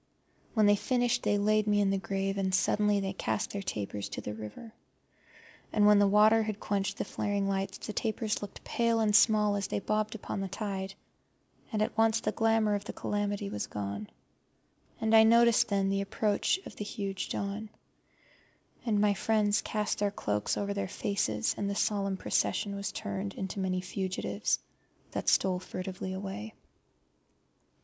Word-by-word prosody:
When 215 -2 +5
they 205 - +6
had 205 - 0
finished 245 -2 +1
they 205 - +2
laid 215 +1 +2
me 205 0 +3
in 200 -1 +3
the 195 - +1
grave, 195 0 -2
and 190 -1 +1
suddenly 210 +2 +2
they 195 0 -2
cast 110 - -2
their 200 - -3
tapers 105 - -4
to - - -5
the 105 - -5
river. 110 - -9 1.0
And 210 -1 +3
when 210 0 +7
the 205 - +5
water 215 +2 +5
had 215 -1 -3
quenched 200 0 -1
the - - -2
flaring 200 -1 -1
lights 195 0 -2
the 215 - -6
tapers 220 -1 -1
looked 205 -1 -8
pale 235 -5 +1
and 215 -2 +3
small 210 -2 +5
as 200 -1 -1
they - - -2
bobbed 215 +2 -1
upon 205 - -5
the 195 - -2
tide, 195 -1 -4 0.8
and 215 -2 +1
at - - -3
once 225 0 +3
the - - -1
glamour 225 -2 +2
of 205 -1 -1
the - - -6
calamity 205 0 -2
was 105 - -3
gone, 100 0 -5 0.9
and 220 0 +3
I 220 - +9
noticed 235 +1 +5
then 195 -2 +1
the 195 0 +1
approach 205 - +1
of - - -9
the - - -4
huge 200 -2 -4
dawn; 205 +2 -3 1.1
and 215 -4 +1
my 205 0 +4
friends 210 0 +2
cast 210 -1 -2
their 205 0 +2
cloaks 105 - -1
over 200 0 -1
their 200 -2 -2
faces, 110 - -1
and 200 - -1
the 200 - -2
solemn 200 -2 0
procession 200 +1 0
was 200 -1 -3
turned 100 - -4
into 190 +1 -4
many 185 -1 0
fugitives 185 0 -1 0.5
that - - 0
furtively 185 0 -1
stole - - -4
away. 200 +3 -6
205 Hz, 175 wpm, -30 LUFS, 195-215 Hz, 1.1 s, I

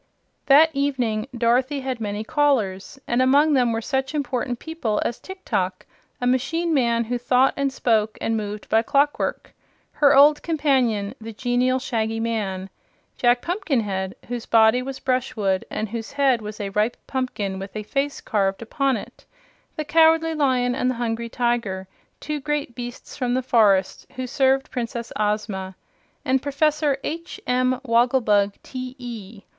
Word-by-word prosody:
That 300 +3 +7
evening 255 -6 -1
Dorothy 250 +4 +1
had 260 -3 -4
many 205 0 -3
callers, 265 -6 0
and 240 +1 +1
among 285 +4 +4
them 250 -3 +3
were 225 0 -2
such 265 +2 -2
important 250 -4 -2
people 250 -9 -3
as 235 - -2
Tiktok, 190 - -3 0.3
a 245 - -2
machine 325 +7 +1
man 235 -4 +2
who 245 +2 -3
thought 250 +2 +3
and 280 -1 0
spoke 220 -4 +1
and 225 - -1
moved 210 -1 -4
by 220 - +3
clockwork; 285 +5 0 0.4
her 290 -2 +4
old 295 +2 +6
companion 260 -10 +1
the 225 +1 -7
genial 250 +3 +1
Shaggy 225 -3 -2
Man; 200 -5 -3 0.4
Jack 245 0 +2
Pumpkinhead, 230 - -1
whose 240 -1 -5
body 225 +2 +5
was 265 +1 -6
brush 255 -1 -1
wood 195 -4 0
and 215 - -3
whose 225 +2 -6
head 270 -4 +2
was 210 0 -7
a 200 -1 -3
ripe 210 +4 0
pumpkin 210 -7 -3
with 195 +2 -8
a 215 - -3
face 275 +6 -2
carved 195 -1 -1
upon 270 +2 0
it; - - -11 0.5
the 305 - -3
Cowardly 325 +1 +4
Lion 255 -5 +1
and 250 0 0
the 255 - -1
Hungry 235 0 -3
Tiger, 230 -6 -1 0.3
two 300 0 -4
great 295 -3 -2
beasts 245 0 -8
from 250 -2 -1
the 260 - 0
forest, 205 -6 +2
who 255 0 -3
served 265 +1 +1
Princess 235 -2 -4
Ozma, 210 -3 -2 0.5
and 260 0 +2
Professor 290 0 +1
H. 335 +2 -5
M. 255 0 +1
Wogglebug, 230 -5 +2
T.E. 245 -5 -8
245 Hz, 155 wpm, -23 LUFS, 220-275 Hz, 0.5 s, That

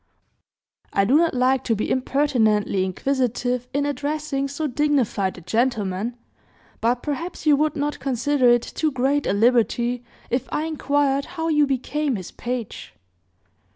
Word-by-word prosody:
"I 195 - +2
do 250 +8 +3
not 330 -2 +3
like 255 +1 +2
to 225 - +1
be 215 - -2
impertinently 230 -8 +1
inquisitive 245 +4 -1
in 285 +1 0
addressing 290 0 -2
so 285 +3 -4
dignified 255 -9 0
a - - -10
gentleman, 220 +2 -1 0.6
but 240 +2 0
perhaps 320 +4 -4
you 300 -2 +6
would 305 0 +1
not 295 +1 -2
consider 265 0 +2
it 240 -1 +4
too 310 -1 -1
great 270 +2 0
a - - +2
liberty, 240 +2 +2 0.3
if 250 +2 -1
I 300 - -1
inquired 285 -3 0
how 325 0 -1
you 300 -2 +3
became 275 +1 -1
his 185 -4 -7
page?" 240 -3 -5
260 Hz, 145 wpm, -23 LUFS, 235-290 Hz, 0.6 s, you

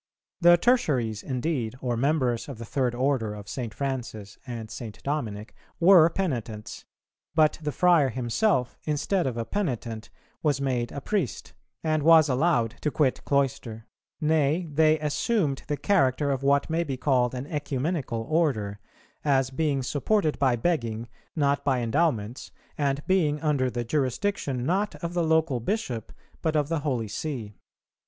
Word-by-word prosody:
The 175 0 +7
Tertiaries 135 - +1
indeed, 130 -3 -2
or 125 -2 -1
members 130 -1 0
of 135 - -7
the 115 - -7
third 125 +1 -1
order 125 -5 0
of 105 -1 -10
St. 120 -2 -4
Francis 120 -7 -5
and 115 -3 -6
St. 110 -2 -7
Dominic, 110 -8 -3 0.3
were 170 -2 +7
penitents; 120 - -4 0.5
but 155 -1 +3
the 150 -1 -2
friar 170 -3 +4
himself, 125 - 0
instead 155 +4 0
of 120 -3 -3
a 115 - -2
penitent, 120 - -3 0.3
was 145 -3 +1
made 125 -3 -1
a 140 - -6
priest, 180 - -2 0.3
and 155 -1 +1
was 160 0 +6
allowed 125 -4 +2
to 150 - +1
quit 140 -3 0
cloister. 130 -5 -1 0.3
Nay, 155 +2 +1
they 155 +1 +4
assumed 150 - 0
the 145 0 -1
character 145 -7 +2
of 135 -1 -1
what 140 +1 +2
may 165 +1 0
be 135 -5 -4
called 130 -2 +1
an 125 +2 -4
Ecumenical 145 -4 -2
Order, 125 -11 0 0.4
as 135 -3 +2
being 140 -1 0
supported 155 +5 0
by 130 -3 +3
begging, 115 -5 -1 0.3
not 140 -2 +1
by 135 -3 +1
endowments, 120 -2 0 0.3
and 140 -1 -1
being 160 -6 +2
under 145 -5 +1
the 120 0 -3
jurisdiction, 130 - -1
not 195 +6 0
of 170 0 -3
the 175 - +1
local 160 -5 +2
Bishop, 120 - -3 0.3
but 160 -1 0
of 150 -1 +1
the 165 -2 0
Holy 130 -7 -1
See. 110 -1 -5
140 Hz, 150 wpm, -26 LUFS, 120-155 Hz, 0.5 s, The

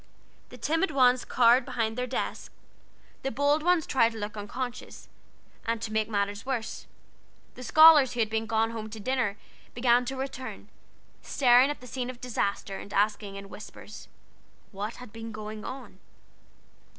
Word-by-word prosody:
The 250 - -11
timid 325 +9 0
ones 255 -3 +4
cowered 245 +1 +4
behind 225 -2 -2
their 250 +1 -2
desks, 255 - -4 0.7
the 270 - -2
bold 285 +4 +2
ones 350 -1 +2
tried 230 -3 +2
to - - -8
look 210 0 -5
unconscious, 245 +4 -6 0.5
and, 230 0 -1
to 220 -1 -5
make 220 0 0
matters 205 -1 -1
worse, 255 -4 -4 0.7
the - - -11
scholars 305 0 +7
who 245 - -5
had 220 0 -1
gone 225 0 +1
home 220 -1 -6
to 220 0 -8
dinner 235 -3 -1 0.4
began 245 0 +3
to 270 - -4
return, 265 -1 -6 0.5
staring 250 0 +4
at 290 - -5
the - - -11
scene 250 0 -4
of 250 -1 -8
disaster, 200 -5 -2
and 200 - -8
asking, 205 -1 0
in 200 0 -8
whispers, 210 +1 -11 0.6
what 210 +2 -5
had 250 -4 -12
been 225 0 -7
going 215 0 -7
on? 250 -8 -8
235 Hz, 160 wpm, -28 LUFS, 215-255 Hz, 0.7 s, scholars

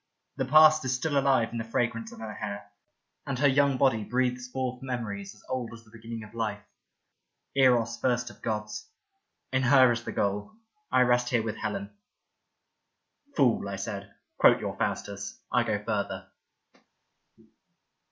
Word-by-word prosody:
The 130 - 0
past 155 +3 +7
is 130 -1 0
still 145 +3 -2
alive 135 -4 +3
in 115 - -4
the - - -2
fragrance 115 0 -2
of - - -11
her 110 -1 -5
hair, 100 -1 -6 0.6
and 135 - -2
her 140 +2 +4
young 140 -1 +3
body 125 -5 +3
breathes 125 +2 -1
forth 125 0 -3
memories 110 -6 -5
as 105 - -20
old 125 -3 -3
as 115 - -14
the 110 - -22
beginning 115 0 -8
of 110 +1 -13
life 105 -3 -3 0.5
— - - -53
Eros 120 -4 +3
first 125 -1 0
of - - -19
gods. 105 - -4 0.6
In 130 - +3
her 130 -1 +6
is 120 0 -2
the - - -5
goal. 100 - -1 0.4
I 130 - +4
rest 125 0 +3
here 120 -3 +1
with 110 -2 -4
Helen." 200 0 -4 0.7
" 285 -1 -40
Fool," 120 -8 +2
I 100 - -3
said, 100 0 -5
" - - -53
quote - - +6
your - - -4
Faustus. 100 0 -3
I - - +3
go 105 -1 -2
further." 105 -2 -3
120 Hz, 170 wpm, -28 LUFS, 110-130 Hz, 0.7 s, past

